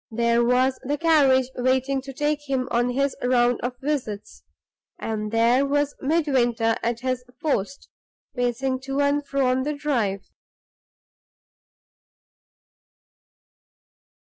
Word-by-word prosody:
There 235 +1 +2
was 255 +2 +2
the 290 +3 -2
carriage 275 -5 +3
waiting 260 +2 0
to 270 +1 -9
take 295 +1 -2
him 260 -2 0
on 240 +1 +1
his 275 +2 0
round 245 -1 +2
of 245 +1 -3
visits; 260 -8 -4 0.6
and 215 -1 -3
there 235 +4 +3
was 290 +1 0
Midwinter 260 -7 +1
at 235 0 -2
his 255 -1 -2 0.2
post, 280 -5 -2 0.5
pacing 250 +1 -1
to 270 +1 -2
and 285 +1 +2
fro 275 -1 -1
on 255 +1 +2
the 295 +3 -2
drive. 235 -10 -1
260 Hz, 115 wpm, -24 LUFS, 240-280 Hz, 0.6 s, carriage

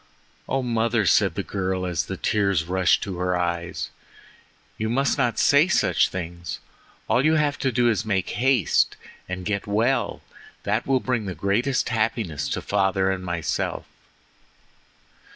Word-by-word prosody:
"Oh, 135 0 0
mother," 115 -2 +1
said 95 -2 +3
the 100 - -2
girl 95 -1 -2
as 90 -3 -1
the - - -4
tears 100 -5 +1
rushed 90 0 +2
to 95 -3 -5
her 90 0 0
eyes, 85 0 -3 0.9
"you 110 0 -1
must 135 +4 +1
not 125 -4 0
say 145 +4 +5
such 190 - +2
things. 85 -2 -5 0.5
All 125 - +2
you 155 +2 +4
have 150 -2 +1
to 135 - 0
do 120 0 +2
is 115 -2 +2
to 110 - -11
make 95 -3 0
haste 125 - +2 0.3
and 90 0 -4
get 105 0 -2
well—that 115 +6 -2
will 135 -2 +2
bring 125 -4 -1
the 95 - -4
greatest 110 - 0
happiness 110 - -1
to - - -3
father 95 0 +1
and 95 -1 -3
myself." 85 -4 -2
100 Hz, 150 wpm, -24 LUFS, 90-120 Hz, 0.9 s, say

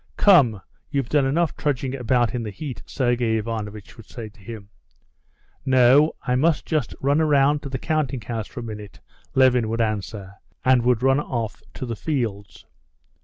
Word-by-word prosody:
"Come, 130 - +5 0.3
you've 140 -4 -2
done 145 -3 +3
enough 165 +3 +1
trudging 135 -3 -2
about 125 -2 +1
in 125 - -2
the 110 - -4
heat," 135 +4 -7
Sergey 120 -4 0
Ivanovitch 110 0 -5
would 115 - -13
say 115 -3 -7
to 105 - -23
him. 100 0 -9 0.9
"No, 130 +3 +5
I 125 - 0
must 150 +5 +2
just 155 -7 -1
run 140 +3 +2
round 145 -2 +3
to 140 - -7
the 130 - -3
counting 145 -3 -1
house 110 0 -4
for 125 - -8
a - - -7
minute," 105 -2 -8 0.4
Levin 125 -4 +4
would 115 +1 -2
answer, 105 -3 -3 0.3
and 130 -1 +5
he 120 - -2
would 125 -1 +2
run 135 +1 +4
off 115 -7 -4
to - - -5
the 115 -2 -4
fields. 105 - -4
125 Hz, 175 wpm, -23 LUFS, 110-140 Hz, 0.9 s, Come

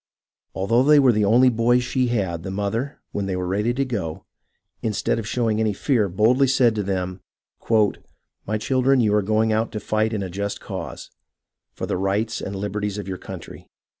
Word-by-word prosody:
Although 110 +6 +2
they 150 +3 +6
were 135 -3 +6
the 105 -2 +2
only 120 +5 +5
boys 120 +1 +2
she 125 0 0
had, 95 -8 -1
the 95 - -6
mother, 105 +8 -3
when 100 -1 -3
they 95 - -1
were 90 0 -2
ready 105 +6 0
to 135 +1 0
go, 100 -11 -4 0.6
instead 110 +1 0
of 110 - -5
showing 110 -2 0
any 110 -2 +1
fear, 110 -2 +1
boldly 115 +9 +3
said 125 -3 +3
to 105 - -1
them: 95 -1 -3 0.2
" - - -29 0.8
My 110 +1 0
children, 130 +4 +2
you 110 -3 +3
are 105 - +4
going 110 +2 +1
out 110 +1 0
to 105 - -3
fight 110 +1 0
in 105 -3 -2
a 95 - -5
just 100 +2 -3
cause, - - -7 0.6
for - - -4
the - - -2
rights 100 +4 -1
and 100 - -5
liberties 105 +1 -3
of 105 - -6
your 95 -1 -5
country. - - -10
110 Hz, 195 wpm, -23 LUFS, 100-120 Hz, 0.8 s, they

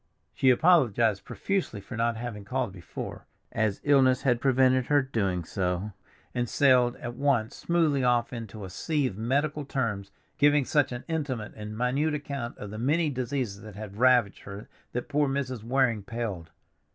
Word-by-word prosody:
She 130 - +3
apologized 120 - +4
profusely 195 - -2
for 115 - -9
not 115 0 0
having 115 -3 -6
called 125 +1 -2
before, 90 -4 -8 0.2
as 110 -3 0
illness 135 -3 +4
had 120 -3 +2
prevented 130 -1 +3
her 145 -1 +3
doing 100 -9 -1
so, 90 +4 -2 0.4
and 120 -2 -1
sailed 125 -3 +4
at 120 - -6
once 125 -4 0
smoothly 160 -6 +1
off 120 0 +2
into 110 -3 -7
a 95 - -9
sea 150 - -1
of 110 - -2
medical 145 +7 0
terms, 115 -8 -2 0.3
giving 145 -1 +4
such 145 -1 +2
an 120 +1 -5
intimate 140 -10 -3
and 105 0 -7
minute 140 +6 +1
account 140 -5 -5
of 105 - -8
the 110 - -6
many 150 +5 +1
diseases 125 -5 -3
that 105 -1 -11
had 105 -1 -8
ravaged 125 -4 +4
her 100 +1 -9 0.3
that 125 - -3
poor 145 -1 +1
Mrs. 130 -4 -2
Waring 120 -2 +1
paled. 100 -6 -5
125 Hz, 165 wpm, -27 LUFS, 110-140 Hz, 0.4 s, apologized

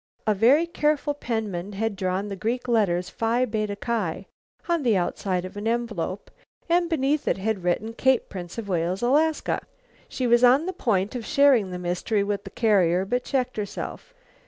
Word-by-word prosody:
A 215 - +3
very 250 - +4
careful 300 -3 0
penman 210 -8 -4
had 220 +1 -2
drawn 190 +1 -2
the 200 - -5
Greek 230 +6 -2
letters, 190 -7 +1
Phi 235 +3 0
Beta 215 -3 -2
Ki, 200 -4 -2 0.4
on 340 -2 +1
the 235 -7 +3
outside 185 0 -1
of 185 - -9
an 205 +2 -4
envelope, 225 -5 -2 0.4
and 345 0 +2
beneath 295 -2 0
it - - +2
had 200 -1 -2
written, 200 +6 -1
"Cape 260 +1 +2
Prince 175 0 -8
of 225 -3 -5
Wales, 180 +2 -1
Alaska." 300 +5 +2
"Wha - - -28 0.2
" - - -31
She 255 - -2
was 240 0 +4
on 260 +6 +6
the 375 - -3
point 205 - 0
of 245 -2 -4
sharing 270 -7 +4
the 180 - -5
mystery 180 +4 -1
with 200 0 -3
the - - -7
carrier, 190 -5 +2
but 245 +5 -1
checked 255 -3 -1
herself. 215 - -6
220 Hz, 185 wpm, -25 LUFS, 190-255 Hz, 0.4 s, on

